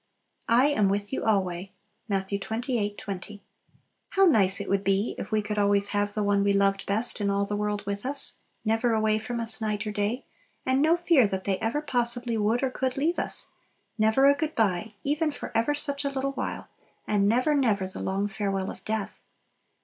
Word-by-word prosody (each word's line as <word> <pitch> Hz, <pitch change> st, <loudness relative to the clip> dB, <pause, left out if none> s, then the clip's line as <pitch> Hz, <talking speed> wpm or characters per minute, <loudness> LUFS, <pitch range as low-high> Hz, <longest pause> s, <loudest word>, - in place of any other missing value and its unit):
"I 240 Hz, +3 st, +5 dB
am 210 Hz, -9 st, +2 dB
with 205 Hz, +4 st, -2 dB
you -, -, -2 dB
alway." 190 Hz, -3 st, -1 dB, 0.4 s
Matt. 195 Hz, -1 st, -1 dB
xxvlii. 220 Hz, +1 st, -2 dB
20. 200 Hz, +1 st, -7 dB, 0.7 s
How 390 Hz, 0 st, +3 dB
nice 205 Hz, -, +4 dB
it -, -, -5 dB
would 195 Hz, 0 st, 0 dB
be 195 Hz, +3 st, +1 dB
if -, -, -7 dB
we 215 Hz, -1 st, +1 dB
could 210 Hz, 0 st, -3 dB
always 200 Hz, 0 st, +4 dB
have 205 Hz, 0 st, -1 dB
the 210 Hz, -, 0 dB
one 200 Hz, 0 st, +2 dB
we 200 Hz, 0 st, +2 dB
loved 195 Hz, 0 st, +1 dB
best 220 Hz, +2 st, 0 dB
in 200 Hz, -, 0 dB
all 200 Hz, 0 st, 0 dB
the 205 Hz, -, -3 dB
world 210 Hz, 0 st, -2 dB
with 200 Hz, 0 st, -4 dB
us; 275 Hz, +2 st, +5 dB, 0.3 s
never 225 Hz, +2 st, +1 dB
away 215 Hz, 0 st, +1 dB
from 235 Hz, +2 st, -5 dB
us 230 Hz, -1 st, +2 dB
night 210 Hz, 0 st, -2 dB
or 210 Hz, -, -3 dB
day, 210 Hz, +4 st, -2 dB, 0.4 s
and 260 Hz, +1 st, +2 dB
no 320 Hz, +3 st, +4 dB
fear 335 Hz, -, +4 dB
that 190 Hz, -1 st, -4 dB
they 195 Hz, -2 st, -1 dB
ever 240 Hz, +7 st, -2 dB
possibly 240 Hz, -3 st, -1 dB
would 220 Hz, +4 st, 0 dB
or 265 Hz, -, 0 dB
could 260 Hz, 0 st, -2 dB
leave 325 Hz, +5 st, 0 dB
us; -, -, +2 dB, 0.5 s
never 220 Hz, +5 st, +3 dB
a 280 Hz, -, +7 dB
good 310 Hz, +2 st, -3 dB
bye 210 Hz, 0 st, 0 dB
even 305 Hz, +2 st, 0 dB
for -, -, -8 dB
ever 230 Hz, +6 st, +1 dB
such 285 Hz, -1 st, +2 dB
a 280 Hz, -, 0 dB
little 275 Hz, 0 st, -2 dB
while, 275 Hz, -, -5 dB, 0.4 s
and 205 Hz, -1 st, +2 dB
never, 255 Hz, +7 st, +2 dB
never 225 Hz, -9 st, +1 dB
the 185 Hz, -, -8 dB
long 195 Hz, +2 st, -1 dB
farewell 195 Hz, -1 st, -3 dB
of -, -, -13 dB
death! 215 Hz, -2 st, -4 dB
215 Hz, 205 wpm, -26 LUFS, 200-255 Hz, 0.7 s, a